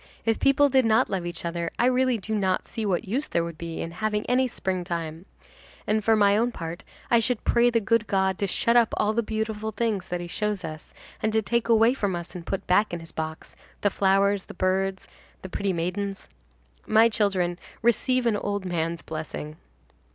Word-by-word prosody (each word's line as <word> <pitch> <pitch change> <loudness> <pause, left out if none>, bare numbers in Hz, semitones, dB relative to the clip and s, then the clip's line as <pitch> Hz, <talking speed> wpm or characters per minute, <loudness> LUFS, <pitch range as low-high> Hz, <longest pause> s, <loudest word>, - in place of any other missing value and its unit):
If 225 -1 +1
people 275 +1 +4
did 265 -1 +3
not 220 -1 +3
love 185 -3 -2
each 175 0 -6
other, 170 0 -2
I 240 - +3
really 255 -1 +3
do 220 +2 -5
not 190 -3 0
see 225 -3 -3
what 185 0 -1
use 260 +9 -1
there 170 - 0
would 170 -2 -7
be 165 -1 -5
in 165 - -4
having 210 +3 -2
any 255 +1 +2
springtime; 175 -5 -4 0.6
and 215 0 +1
for 225 +1 +4
my 205 -1 +4
own 235 +3 +2
part, 165 -5 -6 0.3
I 235 - +6
should 235 0 -1
pray 240 +1 +4
the 230 -1 +2
good 220 +1 +1
God 190 -1 +1
to 200 - 0
shut 230 +5 +1
up 235 -2 +4
all 210 +1 +2
the 235 - +2
beautiful 220 0 -3
things 215 -4 -1
that 180 -1 -3
he 175 - -5
shows 205 +1 -2
us, 155 -1 -9 0.3
and 220 - +1
to 220 0 +2
take 235 +2 0
away 230 +1 +5
from 200 -8 -1
us 170 0 -6
and 175 -1 -8
put 195 - -3
back 205 +4 +3
in - - -5
his 165 -1 -10
box, 160 0 -6 0.3
the 205 - +2
flowers, 195 0 +2
the - - -11
birds, 190 +1 0
and - - -27
the 190 - -6
pretty 200 +1 -1
maidens. 190 +3 -3 0.6
My 220 +1 +6
children, 190 -6 0 0.2
receive 250 +2 +2
an 225 -3 +2
old 200 -1 -3
man's 165 -3 -2
blessing." 155 -1 -6
200 Hz, 210 wpm, -26 LUFS, 175-225 Hz, 0.6 s, I